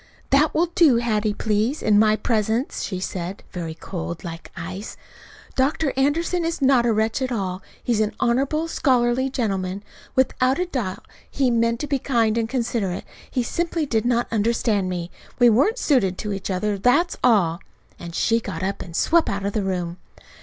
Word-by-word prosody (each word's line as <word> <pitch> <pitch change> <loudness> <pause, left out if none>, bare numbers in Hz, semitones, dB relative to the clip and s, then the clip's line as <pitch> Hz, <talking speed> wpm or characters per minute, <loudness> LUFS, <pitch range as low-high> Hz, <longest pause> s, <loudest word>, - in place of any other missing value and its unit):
"That 290 +3 +4
will 335 - +4
do, 315 -8 +5
Hattie, 215 -3 0
please, 220 +8 0
in 210 -1 +4
my 215 0 +5
presence," 220 +3 -1
she 185 -3 -3
said, 185 +1 -5
very 165 -3 -5
cold, 85 - -6
like 165 -1 -7
ice. 185 +4 -6 0.6
"Dr. 275 +2 +1
Anderson 325 +6 +1
is 330 0 -2
not 260 -4 +4
a - - +3
wretch 220 +3 0
at 260 -1 -1
all. 190 -5 -2 0.2
He 240 - +1
is 215 - +1
an 215 -1 0
honorable, 275 +7 +1
scholarly 255 -3 +2
gentleman. 195 -6 -2 0.3
Without 260 +6 +1
doubt 200 -8 -3 0.2
he 265 -3 +1
meant 230 0 +1
to - - -1
be 280 -1 0
kind 230 -5 +1
and 225 -1 0
considerate. 230 -7 -2 0.2
He 250 - 0
simply 335 +4 -1
did 225 -4 0
not 240 0 +2
understand 215 -3 +1
me. 175 -1 -4 0.3
We 245 -2 +6
weren't 390 - +3
suited 220 - +2
to 210 -2 -3
each 195 0 -5
other. 200 +2 -1
That's 290 - +3
all." 185 -9 +3 0.4
And 170 -1 -8
she 230 +5 +2
got 185 -6 -5
up 195 +1 -2
and 170 -2 -8
swept 335 - +3
out 200 0 -3
of 200 - -1
the 215 - 0
room. 180 -3 -2
230 Hz, 180 wpm, -23 LUFS, 195-260 Hz, 0.6 s, We